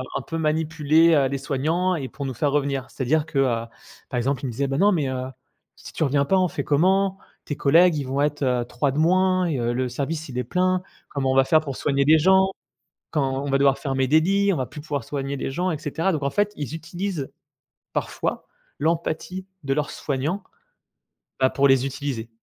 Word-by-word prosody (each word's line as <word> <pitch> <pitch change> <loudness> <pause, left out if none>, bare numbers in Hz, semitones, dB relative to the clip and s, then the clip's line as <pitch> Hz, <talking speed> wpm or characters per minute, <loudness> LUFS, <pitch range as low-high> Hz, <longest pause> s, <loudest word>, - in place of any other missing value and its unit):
un - - -1
peu 165 - -5
manipuler, 160 +1 +3
heu, 140 -3 +3
les 140 0 -3
soignants 160 +7 0
et 135 -5 -4
pour 140 -1 -5
nous 130 - -5
faire 145 +4 0
revenir. 140 -2 0
C'est-à-dire 150 +4 0
que, 150 -3 -2
heu, 115 -4 +1 0.4
par 125 - -3
exemple, 135 +2 -1
ils - - -1
me - - -3
disaient: 140 +4 -1
«Bah, 135 0 -2
non 205 +5 +4
mais 155 -8 +1
heu, 130 -1 -3 0.5
si - - -12
tu - - -1
reviens 140 -1 +2
pas 190 +7 +2
on 185 -1 +3
fait 145 - -4
comment? 190 +7 +2 0.3
Tes 145 - -3
collègues 165 +4 +5
ils 145 - -2
vont 135 +2 -1
être, 150 0 0
heu, 125 -2 +1
3 140 +3 -1
de 140 - -2
moins 185 +2 +3
et 155 -5 -1
heu, 120 0 0
le 125 +1 -1
service 150 +5 -4
il 125 - -6
est 125 - 0
plein. 185 +7 +1 0.3
Comment 135 -2 -1
on - - 0
va 135 - +6
faire 155 +4 +4
pour 140 -4 -5
soigner 140 0 +1
des 155 +2 +6
gens? 190 +3 +4 0.6
Quand 135 -3 0
on 145 - -3
va 135 - +3
devoir 140 -1 +3
fermer 135 -2 -1
des 155 +4 +5
lits, 200 +4 +2
on - - -3
va 130 - -1
plus 150 - -10
pouvoir 145 -4 -4
soigner 140 +2 -3
les 135 - -3
gens 180 +6 -1
et 160 - -1
cetera», 160 +4 -1
donc 155 -3 -2
en 140 - 0
fait, 205 +6 0
ils 145 +1 -5
utilisent 165 -1 -4 0.6
parfois - - -3 0.3
l'empathie 165 +4 -2 0.2
de 135 0 0
leurs 150 -1 -1
soignants, 150 +8 -2 1.0
bah, 130 0 +4
pour 140 +1 +3
les 135 -2 +4
utiliser. 135 -4 -4
145 Hz, 225 wpm, -23 LUFS, 135-165 Hz, 1.0 s, va